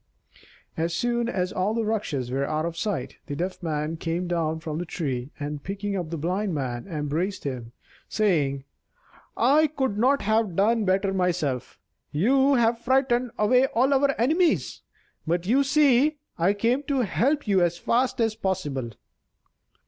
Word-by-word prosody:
As 165 +1 -1
soon 240 +2 0
as 185 -5 -2
all 200 +4 0
the 230 -1 0
Rakshas 160 - -2
were 135 +1 -1
out 155 +1 -1
of 170 -1 -4
sight, 165 - -3
the 145 - -4
Deaf 180 +4 -4
Man 155 -1 -2
came 170 +2 -2
down 160 -2 -1
from 155 -1 -4
the - - -2
tree, 130 -6 -3
and, 145 0 -5
picking 200 +1 -3
up 175 -4 -3
the 165 - -4
Blind 180 +4 -1
Man, 125 -2 -3
embraced 160 +3 -2
him, 125 -4 -5 0.4
saying: 150 -10 +1 0.7
"I 295 +6 +4
could 265 -8 -2
not 260 +1 +3
have 215 -3 +1
done 215 +3 +2
better 195 +1 +1
myself. 175 -9 -1 0.3
You 265 - +3
have 230 -1 +2
frightened 255 0 +1
away 250 +5 +4
all 260 +4 +2
our 275 -1 +2
enemies, 320 +8 +1 0.5
but 170 +2 0
you 260 +8 +3
see 285 +1 +3 0.2
I 180 +4 +2
came 235 +6 +1
to 275 -3 +1
help 260 +6 0
you 195 -3 +3
as 175 0 +1
fast 245 +6 0
as 225 -2 +2
possible." 185 - -2
195 Hz, 160 wpm, -25 LUFS, 160-240 Hz, 0.7 s, I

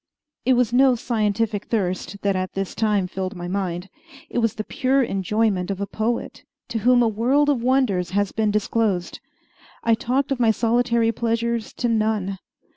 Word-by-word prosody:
It 260 - +4
was 245 -1 +2
no 260 0 +5
scientific 215 -2 -1
thirst 195 -2 -2
that 200 -1 +1
at 185 0 -2
this 195 -1 -3
time 210 -4 +1
filled 190 +1 -4
my 175 -1 -6
mind. 180 -1 -3 0.4
It - - 0
was 230 -2 +1
the 215 - -3
pure 265 +3 +1
enjoyment 195 -2 0
of 195 -1 -3
a 200 - -1
poet 220 +3 -3 0.3
to 225 - -2
whom 245 +2 +4
a - - +3
world 250 +7 +2
of 270 -5 +1
wonders 235 -9 +1
has 200 +1 0
been 220 -1 0
disclosed. 210 -3 0 0.6
I 230 - +3
talked 255 +5 0
of 270 - 0
my 235 -2 +4
solitary 235 0 +2
pleasures 230 0 -1
to 245 - -1
none. 215 -4 0
220 Hz, 175 wpm, -23 LUFS, 195-240 Hz, 0.6 s, no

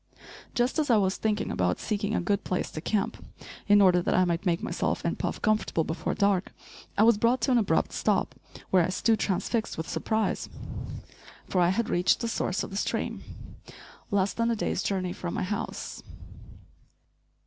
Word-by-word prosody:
Just 245 +6 +1
as 300 -2 0
I 235 - +6
was 190 -2 +1
thinking 215 -1 -1
about 90 0 0
seeking 210 0 -1
a - - +2
good 200 +3 0
place 185 - -2
to 155 - -6
camp 200 +2 -1 0.4
in 205 0 +6
order 180 -2 +5
that - - 0
I 185 - +4
might 170 +2 -1
make 170 -1 +1
myself - - -1
and - - -1
Puff - - -2
comfortable 215 -6 +1
before 160 +2 -3
dark, 200 -2 +1 0.4
I 210 - +5
was 225 -2 +5
brought 240 +3 +3
to 260 - +1
an 245 - +5
abrupt 215 - +1
stop, - - +1 0.4
where 185 -2 +5
I 165 - 0
stood 220 +4 +2
transfixed 215 +4 -1
with 160 - -4
surprise; 220 0 -1 1.0
for 185 - +1
I 175 - +4
had 220 +4 0
reached 175 +1 +2
the 235 - -2
source 195 -4 -1
of - - -7
the 195 - -4
stream, - - -2 0.9
less 200 -1 +1
than 230 0 0
a 230 - +1
day's 205 - -1
journey 185 -2 -1
from 175 -1 -5
my - - -1
house. 200 +2 -4
200 Hz, 185 wpm, -28 LUFS, 180-220 Hz, 1.0 s, I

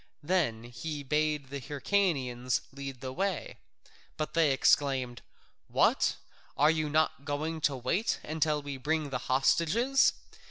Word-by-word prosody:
Then 145 -10 0
he 145 +5 -6
bade 150 -1 0
the 140 - -4
Hyrcanians 135 -5 0
lead 135 -2 -7
the 130 -1 -5
way, 195 +3 -2 0.6
but 155 - -3
they 165 -3 +4
exclaimed, 135 -3 +2 0.5
"What? - - +2 0.4
Are 150 +2 +5
you 155 -2 -1
not 155 -1 +1
going 155 +2 -3
to 145 -2 +2
wait 185 - 0
until 155 -1 0
we 140 -1 -5
bring 150 +1 -1
the 125 - -1
hostages? 170 - +3
145 Hz, 130 wpm, -30 LUFS, 135-160 Hz, 0.6 s, Are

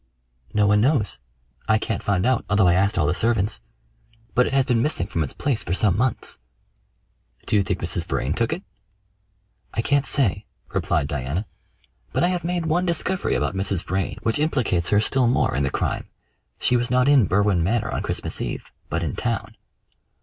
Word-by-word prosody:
"No 105 -1 +2
one 105 0 +4
knows. 125 -4 +1 0.5
I 110 -1 +4
can't 110 -1 -3
find 100 -2 0
out, 130 0 +2
although 105 -1 +4
I 85 - +5
asked 100 +3 +2
all 80 - +3
the 75 - +2
servants; 110 - 0 0.7
but 125 - +3
it - - -4
has 135 -1 +3
been 120 -3 +2
missing 150 +5 0
from 85 - -2
its 75 - -2
place 140 -6 -1
for 90 - -1
some 95 -2 +2
months." 125 +2 -1 1.1
"Do - - 0
you 100 - +5
think 95 - -2
Mrs. - - -1
Vrain 65 +4 -1
took 115 +4 0
it?" 95 - -3 1.1
"I 115 - 0
can't 140 +1 +2
say," 130 -10 +1 0.3
replied 80 -5 0
Diana, 75 - -3 0.7
"but - - +1
I 175 - +3
have 180 -1 -1
made 175 -1 -1
one 165 +3 +1
discovery 175 +2 0
about - - 0
Mrs. 95 -2 -1
Vrain 95 0 -2
which 115 +4 0
implicates 125 - 0
her 105 - +4
still 125 +3 +2
more 120 - +2
in 70 - +1
the 70 - +1
crime. - - -2 0.5
She 125 - +2
was 120 0 +1
not 125 +1 +3
in 140 -8 +5
Berwin 100 -2 +2
Manor 115 +6 0
on - - -2
Christmas - - -1
Eve, - - -5 0.2
but 80 +2 -1
in 75 - -3
town." 110 -3 -3
110 Hz, 195 wpm, -23 LUFS, 95-130 Hz, 1.1 s, I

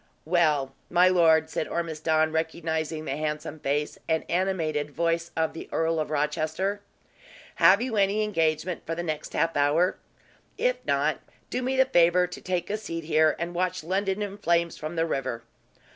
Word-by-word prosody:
"Well, 155 -5 +2 0.2
my 180 +1 +5
lord," 160 -3 +4
said - - -2
Ormiston, 160 -1 0
recognizing 160 -1 -2
the 135 - -3
handsome 150 0 -4
face 145 +1 -2
and 160 0 +1
animated 165 -5 0
voice 165 +2 -1
of 160 0 +1
the 165 - -8
Earl 165 0 0
of 155 - -2
Rochester. 155 +7 -1 0.8
"Have 190 +7 +6
you 250 -3 -3
any 200 +2 +2
engagement 165 -3 0
for 165 - -4
the 175 - -3
next 155 -2 -4
half 165 0 +1
hour? 145 +6 +2 0.6
If - - +1
not, - - +1 0.3
do 250 - -1
me 260 +1 -1
the 265 - +6
favor 175 -6 +4
to 180 - -9
take 180 0 -2
a 210 - 0
seat 165 -6 -5
here, 155 -1 +3
and 170 +1 -4
watch 180 -1 -1
London 195 +3 -1
in 205 0 -6
flames 170 -3 +1
from 155 +2 -6
the 165 0 +1
river." 130 -7 -3
165 Hz, 170 wpm, -26 LUFS, 155-185 Hz, 0.8 s, Have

